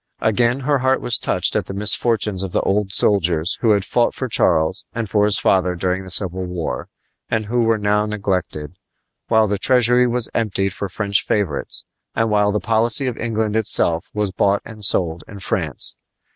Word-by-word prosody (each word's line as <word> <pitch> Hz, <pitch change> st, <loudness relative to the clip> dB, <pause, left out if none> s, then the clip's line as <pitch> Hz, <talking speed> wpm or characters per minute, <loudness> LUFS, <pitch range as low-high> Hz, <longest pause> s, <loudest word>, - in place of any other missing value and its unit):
Again, 120 Hz, +4 st, +1 dB
her 140 Hz, +1 st, +1 dB
heart 130 Hz, +1 st, +1 dB
was 120 Hz, -, 0 dB
touched -, -, -1 dB
at -, -, -1 dB
the 95 Hz, -, -6 dB
misfortunes 105 Hz, -1 st, +1 dB
of 95 Hz, -2 st, -5 dB
the -, -, +1 dB
old 100 Hz, 0 st, -1 dB
soldiers 90 Hz, -3 st, 0 dB
who 115 Hz, -, +2 dB
had 100 Hz, -2 st, 0 dB
fought 120 Hz, -1 st, 0 dB
for 130 Hz, -, -4 dB
Charles 80 Hz, -5 st, +1 dB
and 115 Hz, -2 st, -3 dB
for 105 Hz, +1 st, +1 dB
his 105 Hz, -, +4 dB
father 90 Hz, -1 st, +1 dB
during 90 Hz, +2 st, -2 dB
the 95 Hz, -, -11 dB
Civil 95 Hz, 0 st, +2 dB
War, 90 Hz, -2 st, -5 dB, 0.4 s
and 110 Hz, -1 st, -1 dB
who 120 Hz, +3 st, 0 dB
were 115 Hz, -1 st, +2 dB
now 105 Hz, 0 st, 0 dB
neglected, 95 Hz, -7 st, -3 dB, 0.5 s
while 110 Hz, -1 st, +3 dB
the 100 Hz, -1 st, -2 dB
treasury 125 Hz, +1 st, +3 dB
was 120 Hz, -1 st, +4 dB
emptied 100 Hz, -4 st, -1 dB
for 100 Hz, +1 st, -5 dB
French 100 Hz, +1 st, 0 dB
favorites, 95 Hz, -9 st, -3 dB, 0.3 s
and 115 Hz, -1 st, 0 dB
while 105 Hz, -1 st, +2 dB
the 105 Hz, -, -1 dB
policy 115 Hz, +3 st, +2 dB
of 125 Hz, -3 st, -2 dB
England 110 Hz, -2 st, -2 dB
itself 85 Hz, -6 st, +2 dB
was 105 Hz, -2 st, -2 dB
bought 100 Hz, +2 st, 0 dB
and 110 Hz, -2 st, -11 dB
sold 85 Hz, -5 st, +1 dB
in 105 Hz, -, -11 dB
France. 95 Hz, -, -4 dB
105 Hz, 185 wpm, -19 LUFS, 95-115 Hz, 0.5 s, his